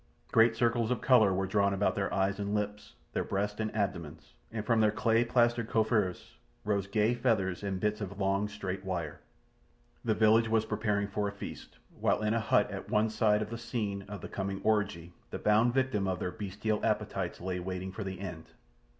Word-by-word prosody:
Great 115 0 +5
circles 115 -1 +1
of 125 - 0
colour 110 -6 +5
were 95 +1 0
drawn 100 +1 +2
about 100 +1 +1
their 100 -1 -2
eyes 95 +1 0
and 100 +1 -1
lips, 105 0 -4 0.2
their - - 0
breasts 105 +2 -2
and 110 -1 -1
abdomens, 85 -7 -3 0.2
and 110 -1 -4
from 115 0 +3
their 110 - +5
clay 115 +2 +2
plastered 120 -1 +2
coiffures 110 -5 0 0.3
rose 100 -2 0
gay 105 +3 +2
feathers 110 -7 0
and 100 -2 -2
bits 105 +2 -1
of 100 -1 -5
long, 100 +1 +1
straight 95 -2 -5
wire. 85 -6 -4 0.8
The 110 -2 +1
village 110 +1 +4
was 110 -1 +2
preparing 105 -2 0
for 105 0 -1
the 100 - -11
feast, - - -8 0.2
while - - +1
in 105 +1 +2
a 115 - +2
hut 105 -1 +2
at 95 - -6
one 110 +1 +2
side 105 -1 +2
of 105 - -9
the 115 - -5
scene 105 -4 -3
of 100 -2 -7
the - - -6
coming 95 0 -3
orgy 95 -6 0 0.2
the - - -4
bound 110 +3 +3
victim 130 -7 +1
of 95 -1 0
their 90 - -3
bestial 105 +1 -3
appetites - - -1
lay 90 0 -3
waiting 95 +1 -4
for 105 +3 -5
the 95 -1 -5
end. 85 -5 -7
105 Hz, 200 wpm, -31 LUFS, 95-110 Hz, 0.8 s, Great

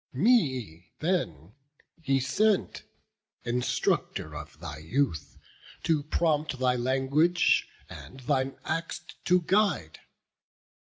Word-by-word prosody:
Me 130 - +1
then 105 - -2 0.5
he 135 -3 +2
sent, 200 +11 +1 0.6
instructor 125 +1 -1
of - - -9
thy 80 -3 -7
youth, 80 - -1 0.5
To 160 -3 +2
prompt 150 -1 0
thy 125 -1 +2
language, 135 +7 +2 0.2
and 130 - -11
thine 130 +1 0
acts 165 +1 -3 0.2
to 180 0 +4
guide. 185 - +1
135 Hz, 95 wpm, -28 LUFS, 120-165 Hz, 0.6 s, to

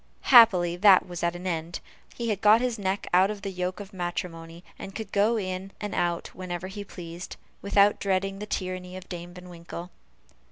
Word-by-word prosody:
Happily, 185 -8 +7
that 190 -1 +6
was 175 -1 -6
at 170 0 0
an 175 +1 -8
end; 170 -1 -3 0.4
he 235 -1 -3
had 205 -2 -1
got 215 +2 +6
his 245 -2 -2
neck 195 0 -1
out 185 +2 +5
of 210 -2 -6
the 195 - -3
yoke 180 0 -3
of 200 0 -9
matrimony, 175 -2 -5 0.2
and 195 - -8
could 220 -3 -6
go 210 +3 +2
in 190 -1 -4
and 210 -2 -5
out 175 -1 -1
whenever 180 -1 -5
he 205 +1 -6
pleased, 175 -2 -9 0.3
without 200 0 +3
dreading 195 0 -1
the 210 - -6
tyranny 185 -2 -4
of 185 - -11
Dame 175 0 -7
Van 180 0 -11
Winkle. 170 0 -9
185 Hz, 195 wpm, -27 LUFS, 175-200 Hz, 0.4 s, Happily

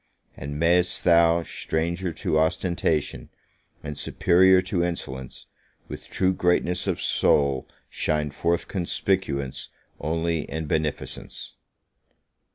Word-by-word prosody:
And 70 +2 -6
may'st 85 +2 +2
thou, 85 -1 +4
stranger 85 +3 -2
to 80 -1 0
ostentation, 80 -2 0 0.5
and 75 - -5
superior 95 +5 +4
to 90 -2 -1
insolence, 65 -7 -5 0.4
with - - -9
true 95 0 +1
greatness 90 0 +1
of - - -1
soul 70 -3 +2 0.2
shine 75 -1 -1
forth 85 +4 -1
conspicuous 85 -7 -2 0.3
only 80 0 -1
in 80 0 -4
beneficence! 75 0 -3
85 Hz, 100 wpm, -25 LUFS, 75-90 Hz, 0.5 s, thou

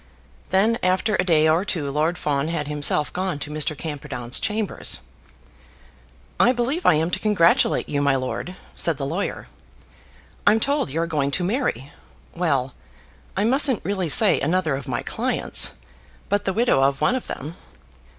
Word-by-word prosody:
Then, 215 +5 +2
after 190 +4 +1
a - - +1
day 160 -4 +3
or 160 +4 +2
two, 155 -9 -3
Lord 155 +5 0
Fawn 145 -3 -1
had 160 -3 -3
himself 150 0 +1
gone 185 -3 -2
to 145 +1 -6
Mr. 155 0 -1
Camperdown's 140 -6 -4
chambers. 215 -1 +1 1.4
"I 245 - +5
believe 260 +8 -1
I 160 - +6
am 160 +3 0
to 190 - -1
congratulate 195 -5 +2
you, 145 -1 -1
my 140 -1 +2
lord," 130 +7 -4 0.2
said 165 -4 0
the 140 - -3
lawyer. 170 +8 -3 1.0
"I'm 220 - +5
told 280 - 0
you 160 +5 -2
are - - 0
going 150 -4 -1
to 175 +6 0
marry; 180 - -2 0.4
well, 140 -7 -1 0.6
I 200 - +2
mustn't 260 +1 +2
really 190 -4 -2
say - - +5
another 160 -1 0
of 140 +2 -7
my 125 0 -3
clients, 250 - +1 0.6
but 205 0 0
the 190 - 0
widow 230 - +2
of 135 0 +2
one - - +2
of 255 - -3
them. 155 +5 -6
165 Hz, 165 wpm, -22 LUFS, 145-205 Hz, 1.4 s, I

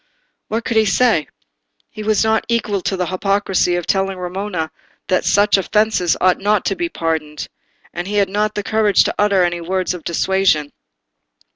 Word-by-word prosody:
What 225 +1 -3
could 230 - 0
he 220 - +4
say? 210 - +2 0.6
He 215 - -8
was 215 0 +1
not 220 0 +1
equal 215 -4 -1
to 190 - -2
the 180 - -1
hypocrisy 190 -1 0
of 175 -1 -3
telling 195 -1 0
Romola 180 -2 -4 0.4
that 185 -1 +1
such 205 0 +4
offences 210 -2 +1
ought 185 0 +3
not 205 0 +1
to - - 0
be 345 -1 -2
pardoned; 160 - -3 0.5
and 175 +1 -4
he 205 - -3
had 200 -1 +3
not 210 +2 -1
the 205 - -2
courage 215 -1 +3
to - - -1
utter 200 -3 +3
any 175 -1 -1
words 185 +2 -1
of 175 -3 -8
dissuasion. 170 -4 +1
195 Hz, 175 wpm, -18 LUFS, 180-210 Hz, 0.6 s, he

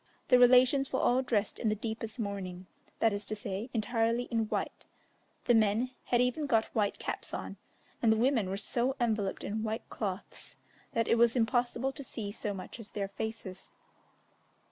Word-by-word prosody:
The 250 - +7
relations 255 +2 +6
were 260 - +1
all 250 +2 +3
dressed 220 -5 0
in 225 - +1
the 215 - +1
deepest 220 +1 -5
mourning 195 -4 -4 0.3
that 225 -2 +3
is 205 +1 -3
to 215 - -2
say, 205 +3 -4
entirely 230 +1 +1
in 225 -1 +1
white; - - -3 0.6
the 240 - +5
men 225 +3 +3
had 240 - +2
even 250 +5 +1
got 225 -4 +3
white 210 -3 +1
caps - - -5
on, - - -6 0.4
and 230 - +5
the 220 - +3
women 235 -4 +2
were 195 - -2
so 245 +5 -1
enveloped 215 -5 0
in 215 +2 -2
white 220 +1 -3
cloths 195 -3 -5 0.4
that 230 -1 +1
it 230 - +3
was 235 0 +5
impossible 245 +2 +1
to 280 +1 -9
see 215 -5 -5
so 210 0 -4
much 195 +4 -7
as 215 -3 -9
their 200 -1 -3
faces. 200 -2 -6
225 Hz, 180 wpm, -31 LUFS, 205-245 Hz, 0.6 s, The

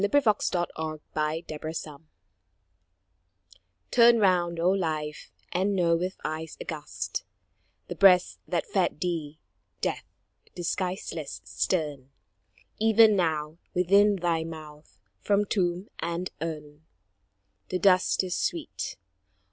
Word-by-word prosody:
RETROSPECT 215 -4 +2 0.2
AND 155 -1 -4
FORECAST 155 +1 -3 2.0
Turn 235 -1 +7
round, 175 -5 +2
O 175 +2 +3
Life, 155 -5 -2 0.2
and 195 +3 +1
know 170 -2 +3
with 180 +3 -2
eyes 155 0 -4
aghast 155 -2 -5 0.6
The - - -4
breast 185 -2 +5
that - - -1
fed 425 - 0
thee 160 -5 -3 0.4
Death, - - -2 0.5
disguiseless, 185 +2 -3
stern; 145 -7 -2 0.7
Even 220 0 +6
now, 160 -3 -1 0.2
within 200 +3 +5
thy 170 -3 0
mouth, 155 -7 -10 0.2
from 205 - +2
tomb 185 -1 0
and 170 +2 -3
urn, 150 -2 -5 0.9
The 185 - 0
dust 185 0 +4
is 180 -1 -2
sweet. 335 -3 -3
175 Hz, 100 wpm, -27 LUFS, 155-195 Hz, 2.0 s, Turn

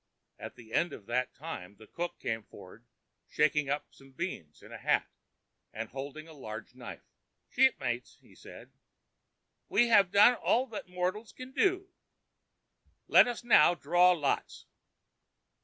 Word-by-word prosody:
At - - -8
the 115 -1 -15
end 175 - +1
of 100 - -10
that 125 +3 -1
time 105 - -8
the 110 - -15
cook 175 +10 -5
came 110 0 -3
for'd - - -15 0.4
shaking 150 -1 +1
up 145 +1 -3
some 135 0 -19
beans 130 - -6
in - - -14
a - - -8
hat, - - +1 0.6
and 115 0 -6
holding 140 +4 -7
a 160 - -13
large 110 -6 -9
knife. 125 -1 -10 0.5
"Shipmates," 130 - +1 0.2
said - - -13
he, - - -43 0.9
"we 235 +3 +3
have 205 -5 +5
done 210 +5 +7
all 245 +1 +1
that 210 -4 -7
mortals 185 +5 -3
can 255 0 -10
do. 380 +3 0 1.1
Let - - +7
us 240 -1 -4
now 175 -8 +5
draw 175 +4 +4
lots." 145 -5 -2
160 Hz, 145 wpm, -30 LUFS, 125-210 Hz, 1.1 s, done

